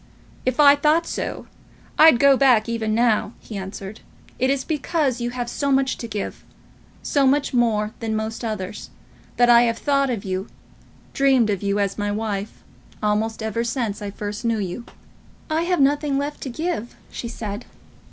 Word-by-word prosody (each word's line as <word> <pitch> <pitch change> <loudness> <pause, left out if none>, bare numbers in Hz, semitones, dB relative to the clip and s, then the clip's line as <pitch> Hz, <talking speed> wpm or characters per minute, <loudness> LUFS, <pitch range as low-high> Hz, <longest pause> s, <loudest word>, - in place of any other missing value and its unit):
"If 255 +1 0
I 285 -1 +8
thought 305 +3 +2
so, - - -4 0.5
I'd 315 -5 +8
go 280 0 +6
back 250 -5 +4
even 225 -2 -1
now," 230 -2 +2
he 220 - -10
answered. 195 +1 -7 0.4
"It 260 +1 +2
is 275 -1 0
because 295 -5 -1
you 240 - -1
have 245 0 -4
so 280 +3 -1
much 265 -1 +2
to 235 - -5
give, 210 -3 -5 0.6
so 280 -2 +2
much 285 +1 +1
more 220 -3 +1
than 225 -1 -2
most 220 +2 -4
others, 210 -3 -5 0.5
that 245 - +5
I 235 -1 +7
have 230 -1 +1
thought 275 0 +1
of 225 -6 -3
you, 190 +2 -3 0.7
dreamed 265 -5 +3
of 200 - -2
you 200 0 0
as 200 0 -1
my 205 0 -1
wife, 210 -1 -4 0.4
almost 220 +1 0
ever 220 +1 -1
since 235 -4 -2
I 205 - -4
first 205 +1 -6
knew 230 -1 +1
you." 205 +4 -4 0.7
"I 320 +2 +1
have 360 -1 +1
nothing 285 0 +2
left 285 +1 -3
to 270 - -4
give," 285 -4 -3 0.2
she 235 - -5
said. 215 0 -6
235 Hz, 175 wpm, -22 LUFS, 210-275 Hz, 0.7 s, I